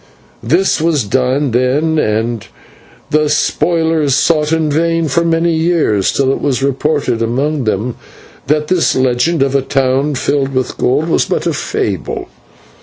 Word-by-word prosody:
This 170 +6 +1
was 160 -5 +1
done 130 +5 0
then, 140 +7 +1
and 110 -2 -1 0.6
the 150 0 +2
spoilers 160 -2 +1
sought 150 +1 +1
in 160 -2 +1
vain 165 +1 +1
for 170 +4 +1
many 165 0 +1
years, 160 - +1
till 135 -1 +1
it - - -3
was 135 -2 -1
reported 140 -3 0
among 135 +4 -1
them 110 +3 -2 0.5
that 150 +1 +1
this 180 -1 +1
legend 130 +5 +1
of 135 -1 -1
a 140 - +2
town 135 +2 0
filled 135 +1 -1
with 130 -1 -2
gold 145 +6 +1
was 165 - +1
but - - -2
a - - 0
fable. - - -3
145 Hz, 150 wpm, -14 LUFS, 130-160 Hz, 0.6 s, the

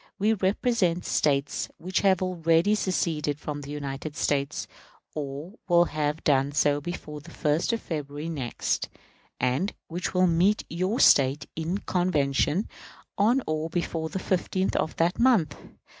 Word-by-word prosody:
We 215 +3 +2
represent 190 -3 +1
States 140 -1 0
which 185 +3 -1
have 190 -2 +3
already 170 +1 +2
seceded 160 -7 -1
from 145 -1 -5
the 140 - -9
United 145 +1 -5
States, 140 -2 -1 0.5
or 145 +4 -5
will 175 -1 +5
have 150 0 -2
done 140 -1 +2
so 145 0 +2
before 150 -2 -6
the 170 - -13
1st 155 +5 0
of 230 - -2
February 150 -1 -5
next, 140 -8 -2 0.5
and 130 +11 0
which 175 +2 -3
will 185 0 +5
meet 180 +5 +3
your 185 +8 -1
State 140 +1 +5
in 165 +4 -2
convention 175 -1 +1 0.5
on 240 +6 +3
or 155 +1 -2
before 165 -2 -2
the - - -4
15th 185 0 -1
of 160 - -1
that 170 +2 +1
month. 225 - +3
165 Hz, 145 wpm, -26 LUFS, 145-185 Hz, 0.5 s, will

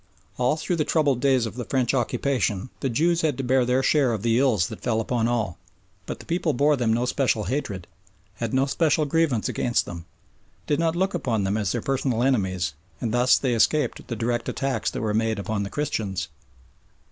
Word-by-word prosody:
All 125 +5 +2
through 170 +2 -2
the 155 - +2
troubled 145 -5 +1
days 130 -4 +3
of 110 - -5
the 125 +1 -5
French 130 0 0
occupation 125 -3 0
the 135 - -1
Jews 165 +8 +2
had 150 -5 0
to 135 - -3
bear 130 0 +3
their 125 +2 +1
share 135 -4 +3
of 110 -2 -4
the 115 0 +3
ills 115 -10 +3
that - - -8
fell 115 -3 0
upon 115 0 0
all; 115 -7 -1 0.5
but - - -4
the - - -13
people 170 -2 0
bore 145 +4 +3
them 120 -4 0
no 120 +2 +1
special 125 -4 +1
hatred, 100 -5 -3 0.5
had 115 -2 -3
no 130 +1 +2
special 155 +2 +1
grievance 145 -6 +1
against 120 -1 0
them, 85 -1 -8 0.6
did 145 - 0
not 165 0 +1
look 190 +3 0
upon 120 - -1
them 95 +1 0
as 105 -4 0
their 120 - -2
personal 130 -3 0
enemies, 95 - 0 0.3
and 115 -2 -2
thus 125 +1 +4
they 130 -3 0
escaped 145 +6 +1
the 120 - -3
direct 120 +1 -1
attacks 135 -1 -1
that - - -5
were 105 -1 -1
made 110 0 +1
upon 100 +1 -2
the 100 - -3
Christians. 100 - -2
125 Hz, 205 wpm, -24 LUFS, 110-140 Hz, 0.6 s, thus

